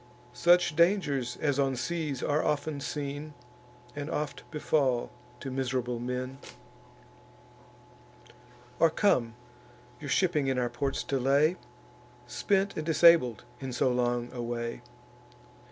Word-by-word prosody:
Such 175 +4 +4
dangers 145 -8 +2
as 145 -2 0
on 135 -1 +1
seas 150 +1 -3
are 150 +2 +1
often 150 0 -1
seen, 145 +1 -5 0.6
And 145 +1 -5
oft 150 -2 -4
befall 140 -5 0 0.3
to 135 - -5
miserable 125 -2 -2
men, 125 +2 -4 2.4
Or 165 - +6
come, 125 - +1 0.6
your 145 - -7
shipping 155 -4 +2
in 130 -1 0
our 125 -1 0
ports 135 +3 -2
to 135 - -1
lay, 140 +6 +3 0.7
Spent 195 +9 0
and 155 - -3
disabled 160 -7 +5 0.2
in 135 -1 -5
so 125 +1 +1
long 120 -1 0
a 125 - -4
way? 120 0 -4
140 Hz, 120 wpm, -29 LUFS, 125-155 Hz, 2.4 s, Or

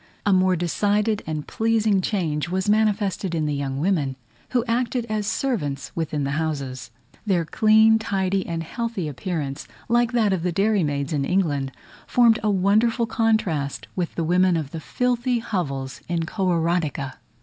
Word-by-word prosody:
A 205 - +4
more 185 0 +4
decided 205 +5 +1
and 155 -2 -3
pleasing 220 -3 +1
change 170 -6 -1
was 190 +2 -1
manifested 205 -4 +1
in 155 -2 0
the 150 - -1
young 140 -1 -2
women, 150 -6 0 0.3
who 245 -2 +1
acted 240 0 0
as 215 -1 -1
servants 145 - -2
within 155 -3 -2
the 140 - -1
houses. 140 -6 -4 0.3
Their 185 -6 +1
clean, 220 +5 +5
tidy, 195 -2 0
and 165 -1 -3
healthy 230 -1 -3
appearance, 150 -2 -4 0.2
like 240 0 +2
that 220 -5 +3
of 185 - -1
the 180 +1 0
dairy 200 +2 +2
maids 145 0 -2
in 145 -2 0
England, 145 -5 0 0.4
formed 235 -2 +4
a 215 - +1
wonderful 215 +5 +2
contrast 215 - 0
with 175 -3 -2
the 170 - -1
women 180 +1 +3
of 145 -4 -4
the 165 - -5
filthy 250 - 0
hovels 145 - -3
in 170 -1 0
Kororadika. 170 -6 -1
185 Hz, 160 wpm, -23 LUFS, 155-220 Hz, 0.4 s, clean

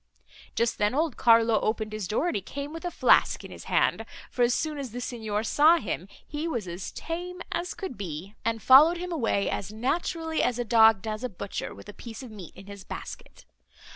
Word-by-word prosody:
Just 235 0 0
then 210 +4 +2
old 310 -2 0
Carlo 230 -2 +5
opened 215 0 -1
his 215 -4 -4
door, 215 - 0
and 350 - 0
he 200 - -1
came 280 - -6
with 330 - -7
a - - 0
flask - - +3
in - - -10
his - - -10
hand; - - +2 0.3
for, 250 - -3
as 240 0 +4
soon 305 -2 -2
as 260 -5 -6
the 245 - -4
Signor 220 -4 -3
saw 305 +8 +5
him, 190 - -4 0.2
he 300 +2 -4
was 235 - -3
as 175 +2 -6
tame 355 +2 -5
as 345 +1 -3
could 370 - -6
be, 180 +1 -6
and 225 -1 -1
followed 300 +7 +8
him 360 +1 -5
away 230 -10 0
as 205 - -3
naturally 320 +7 -1
as 245 - +1
a 245 - -2
dog 220 -3 +5
does 215 +1 -4
a 250 - -1
butcher 195 -1 -6
with - - -13
a 210 - -9
piece 230 +3 -9
of 245 - -10
meat 195 -6 -10
in 190 - -12
his 200 -1 -10
basket. - - -9
235 Hz, 220 wpm, -27 LUFS, 210-310 Hz, 0.3 s, followed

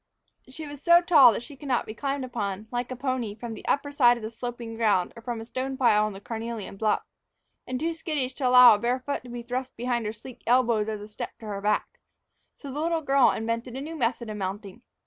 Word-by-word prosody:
She 310 +4 -8
was 290 -1 -9
so 340 +1 +7
tall 300 -9 +7
that 230 - -4
she 285 - -11
could 285 +2 -10
not 250 -3 +1
be 215 - -7
climbed 275 +2 -3
upon, 210 -4 -4
like 245 0 -2
a - - -3
pony, 255 -5 -2
from 230 +1 -6
the - - -10
upper 285 +1 0
side 245 -4 +5
of 220 0 -7
sloping 235 -1 -6
ground 210 -6 +1
or 230 - -10
from 235 0 -4
the 225 - -7
stone 260 +3 -4
pile 215 -5 +4
on 215 - -4
the 195 - -9
carnelian 225 -1 -6
bluff, 215 +1 0 0.6
and 255 0 -3
too 330 +3 -1
skittish 300 -5 -2
to 260 -1 -1
allow 250 -1 +9
a 205 - 0
bare 245 +3 0
foot 285 +2 -3
to - - -10
be 240 0 -6
thrust 250 +2 -4
behind 240 -2 -1
her - - -2
sleek 230 +3 -12
elbows 235 -3 +3
as 215 -1 -4
a 210 - -8
step 225 +3 -7
to 225 - -12
her 200 -2 -4
back, 210 +1 -1 0.6
so 280 - -9
the 290 - -4
little 330 0 0
girl 275 -2 +5
invented 230 +2 -3
a - - -4
new 320 +3 -6
method 235 -4 -1
of 215 -1 -5
mounting. 200 +3 -5
240 Hz, 245 wpm, -26 LUFS, 220-265 Hz, 0.6 s, allow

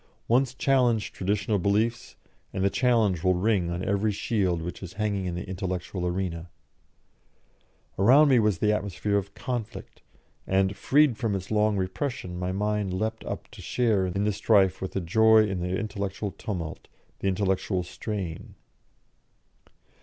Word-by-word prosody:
Once 130 +2 +2
challenge 125 -6 +2
traditional 100 +2 -1
beliefs, 110 +5 0 0.4
and 95 - -2
the 100 - +2
challenge 115 -9 +2
will 90 -1 +3
ring 95 -2 +1
on 85 +1 -3
every 100 +2 +1
shield 95 -4 0
which 90 - -6
is 95 -2 -8
hanging 100 -2 -1
in 85 - -3
the 90 +3 -5
intellectual 90 -1 -3
arena. 90 -2 -3 1.5
Around 135 +9 +6
me 130 -3 +5
was 105 -4 +2
the 105 +2 +2
atmosphere 100 0 -2
of 100 0 -4
conflict, 120 -3 -5 0.5
and, 95 +1 +2
freed 145 -4 +3
from 110 -4 -1
its 95 +1 -6
long 105 -1 +2
repression, 95 +1 -3
my 90 0 -2
mind 105 0 -1
leapt 110 +3 -2
up - - -5
to - - -11
share 110 -6 +1
in 100 +3 -1
the 105 0 +1
strife 95 -2 +3
with 95 - -5
a 95 - 0
joy 110 +5 +5
in 95 -2 -3
the 90 +1 -1
intellectual 100 -2 -3
tumult, 90 -7 -6 0.3
the - - -2
intellectual 95 -1 0
strain. 90 -2 -6
100 Hz, 155 wpm, -27 LUFS, 95-110 Hz, 1.5 s, Around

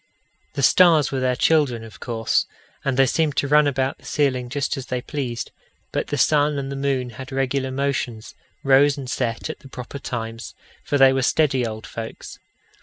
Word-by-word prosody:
The 140 - -2
stars 160 0 +5
were 135 - -1
their 130 -1 +1
children, 135 -5 +2
of 110 -5 -12
course, 115 -2 0 0.4
and 135 -3 -1
they 135 - +6
seemed 150 +2 0
to 140 - +1
run 150 +1 +5
about 135 -1 -1
the - - -20
ceiling 130 -4 0
just 145 +3 -1
as 135 -2 -7
they 125 - -2
pleased; 125 -3 -4 0.4
but - - -2
the 145 - -2
sun 150 +1 +3
and 135 0 -4
the - - -4
moon 135 -3 -1
had 130 +4 -9
regular 135 0 -1
motions 130 -4 -3 0.3
rose 140 +2 +5
and 135 -2 -6
set 120 -3 -2
at 155 - -6
the 140 - -14
proper 125 +2 -8
times, 115 -3 -6 0.3
for 145 - 0
they 135 -1 +6
were 135 - +1
steady 130 -3 +2
old 110 0 -7
folks. 115 -1 -8
135 Hz, 190 wpm, -22 LUFS, 125-145 Hz, 0.4 s, they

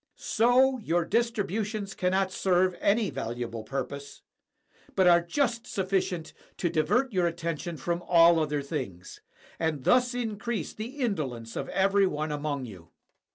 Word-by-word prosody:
So, 255 +3 +3
your 175 -5 0
distributions 215 -2 -1
cannot 190 +1 +1
serve 185 -1 +2
any 210 0 +2
valuable 115 -1 -4
purpose, 140 +4 -6 0.7
but 190 - +4
are 175 -1 +6
just 235 +5 -1
sufficient 185 -3 -1 0.2
to 175 - 0
divert 225 - +1
your 180 -2 +2
attention 170 0 -4
from 170 +5 -2
all 170 -1 +6
other 150 -2 -1
things, 125 - -6 0.4
and 160 -4 -1
thus 245 - +3
increase 220 -5 -3
the 235 +6 -7
indolence 135 - -2
of - - -4
every 195 0 +3
one 155 -2 -2
among 145 -2 -2
you. 90 -7 -12
175 Hz, 135 wpm, -28 LUFS, 150-215 Hz, 0.7 s, are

